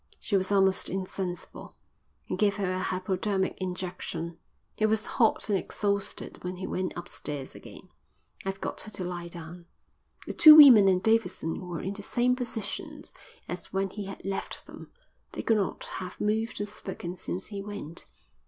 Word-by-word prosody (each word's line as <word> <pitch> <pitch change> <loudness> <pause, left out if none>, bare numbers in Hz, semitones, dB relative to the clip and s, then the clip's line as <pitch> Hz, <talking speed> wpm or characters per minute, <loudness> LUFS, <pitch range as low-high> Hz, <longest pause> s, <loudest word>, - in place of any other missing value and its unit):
She 205 - -1
was 190 0 +1
almost 195 -1 +3
insensible. 185 -1 -5 0.5
He - - -3
gave 205 -2 +2
her 195 -3 -1
a 185 - -2
hypodermic 190 +1 -1
injection. 180 -2 -4 0.4
He 215 - +2
was 220 0 +1
hot 225 -3 +2
and 205 - +2
exhausted 200 0 -3
when 180 +1 -3
he 185 +1 -5
went 185 0 -2
upstairs 150 -5 -5
again. - - -12 0.6
"I've 195 0 -3
got - - -3
her 215 - -8
to 195 - -4
lie 175 -1 -4
down." 170 0 -9 0.6
The - - -4
two 315 -3 +11
women 255 -10 +10
and 185 -1 +3
Davidson 185 -6 +1
were 175 -1 -4
in 195 - -3
the 205 - -7
same 245 +4 +2
positions 240 -4 -5 0.3
as 175 0 -6
when 195 0 -1
he 205 -1 -5
had 195 -1 -8
left 195 0 -4
them. - - -11 0.4
They - - -4
could 225 - +3
not 200 - -2
have 185 -1 -6
moved 220 +2 0
or 205 - -1
spoken 190 -3 -7
since 185 0 -4
he 200 -2 -5
went. 195 -5 -6
190 Hz, 170 wpm, -28 LUFS, 180-210 Hz, 0.6 s, two